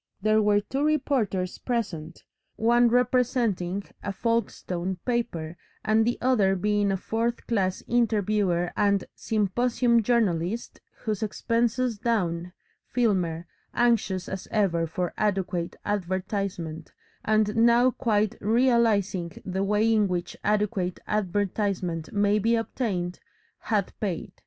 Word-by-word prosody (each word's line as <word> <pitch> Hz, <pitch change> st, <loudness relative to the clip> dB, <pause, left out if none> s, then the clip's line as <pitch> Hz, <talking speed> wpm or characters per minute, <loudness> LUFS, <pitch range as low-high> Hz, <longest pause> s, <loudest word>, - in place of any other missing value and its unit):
There 215 Hz, +2 st, +3 dB
were 205 Hz, -1 st, +3 dB
two 270 Hz, +7 st, -2 dB
reporters 255 Hz, -12 st, 0 dB
present, 170 Hz, -10 st, -3 dB, 0.3 s
one 240 Hz, +2 st, +4 dB
representing 235 Hz, -6 st, +1 dB, 0.2 s
a 200 Hz, -, -3 dB
Folkestone 190 Hz, -5 st, -2 dB
paper 175 Hz, -10 st, -2 dB, 0.3 s
and 220 Hz, +1 st, +3 dB
the 240 Hz, -, 0 dB
other 215 Hz, -7 st, +3 dB
being 205 Hz, +1 st, +1 dB
a 190 Hz, -, 0 dB
fourth 230 Hz, +5 st, -2 dB
class 190 Hz, -5 st, 0 dB
interviewer 210 Hz, -6 st, +1 dB
and 200 Hz, -2 st, +2 dB
"symposium" 235 Hz, +3 st, +1 dB
journalist, 215 Hz, -2 st, 0 dB, 0.2 s
whose 215 Hz, -3 st, -2 dB
expenses 230 Hz, +2 st, 0 dB
down, 180 Hz, -7 st, -1 dB, 0.4 s
Filmer, 180 Hz, -9 st, 0 dB, 0.3 s
anxious 225 Hz, -6 st, +1 dB
as 190 Hz, -1 st, -5 dB
ever 175 Hz, -6 st, +1 dB
for 175 Hz, +2 st, -3 dB
adequate 185 Hz, -4 st, -1 dB
advertisement 185 Hz, -4 st, -3 dB, 0.3 s
and 215 Hz, -1 st, +2 dB
now 235 Hz, +2 st, +5 dB
quite 215 Hz, -3 st, 0 dB
realising 215 Hz, -6 st, +2 dB
the 190 Hz, +1 st, -1 dB
way 210 Hz, +3 st, +2 dB
in 210 Hz, -2 st, +3 dB
which 180 Hz, -1 st, -3 dB
adequate 205 Hz, -3 st, 0 dB
advertisement 195 Hz, -4 st, -1 dB
may 205 Hz, 0 st, +2 dB
be 230 Hz, +3 st, +2 dB
obtained 200 Hz, -6 st, -2 dB, 0.5 s
had 205 Hz, -5 st, 0 dB
paid. 190 Hz, -6 st, -3 dB
210 Hz, 115 wpm, -26 LUFS, 185-230 Hz, 0.5 s, now